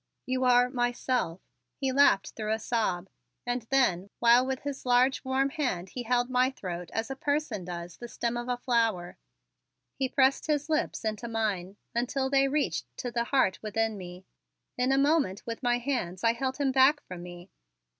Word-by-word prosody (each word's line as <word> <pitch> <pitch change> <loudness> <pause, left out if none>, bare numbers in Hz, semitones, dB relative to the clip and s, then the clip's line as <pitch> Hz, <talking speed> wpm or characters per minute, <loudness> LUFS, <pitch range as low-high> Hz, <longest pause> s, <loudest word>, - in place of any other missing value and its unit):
"You 255 0 0
are 245 0 +5
myself," 245 -7 -1 0.3
he 270 -2 -1
laughed 260 -7 +4
through 215 -1 -4
a - - 0
sob, 215 -6 -1 0.4
and 245 +1 -1
then, 200 -9 +2
while 240 +1 +6
with 260 0 -3
his 285 -1 -5
large 250 +2 +3
warm 265 +1 +1
hand 250 - -2
he 250 - -5
held 245 +1 +1
my 255 0 +2
throat 180 -9 -6
as 225 +4 -3
a - - -3
person 285 - -2
does 175 -1 -7
the 240 - -8
stem 235 0 -2
of 240 +1 -4
a 245 - 0
flower, 225 -8 0 0.8
he 265 -1 -2
pressed 270 +2 +2
his 300 0 0
lips 305 -6 -1
into 220 +2 -2
mine 205 -4 -2 0.2
until 265 +3 -1
they 275 0 +4
reached 290 +2 -1
to 245 - -4
the 235 0 -1
heart 235 -8 +1
within 220 +1 -1
me. 180 -1 -9 0.5
In 250 +1 +1
a 270 - +3
moment 280 - +2
with 230 -1 -5
my 245 -1 +2
hands 240 -9 -3
I 230 0 +4
held 260 +2 -2
him 280 -2 +1
back 270 +3 +4
from 180 -1 -8
me. 175 +1 -10
245 Hz, 185 wpm, -29 LUFS, 210-265 Hz, 0.8 s, while